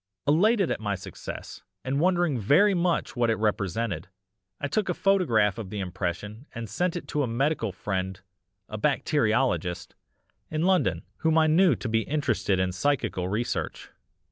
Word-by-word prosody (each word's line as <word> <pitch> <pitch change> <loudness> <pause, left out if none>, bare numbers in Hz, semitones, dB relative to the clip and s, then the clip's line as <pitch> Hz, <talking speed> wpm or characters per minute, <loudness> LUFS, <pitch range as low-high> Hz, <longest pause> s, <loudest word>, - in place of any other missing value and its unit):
"Elated 195 +6 +3
at - - -1
my 105 -2 -1
success 95 - -8 0.2
and 135 +2 0
wondering 175 -5 +2
very 175 - +4
much 175 -5 0
what 120 -2 +2
it 110 - +3
represented, 105 -3 -1 0.5
I 140 - -2
took 210 +7 -1
a - - 0
photograph 120 - +2
of 105 -4 -6
the 105 - -5
impression 100 - -4
and 115 -1 -5
sent 175 - -1
it 175 - -5
to 150 - 0
a 135 - 0
medical 120 -1 0
friend 95 0 -3 0.5
a 110 - -6
bacteriologist 120 - +1 0.6
in 155 +1 -1
London, 185 0 +2
whom 160 0 +2
I 160 - +5
knew 160 -1 +4
to 120 - -5
be 110 0 +2
interested 120 -9 0
in 95 0 +1
psychical 95 -4 0
research. 115 +5 -3
120 Hz, 160 wpm, -27 LUFS, 105-160 Hz, 0.6 s, I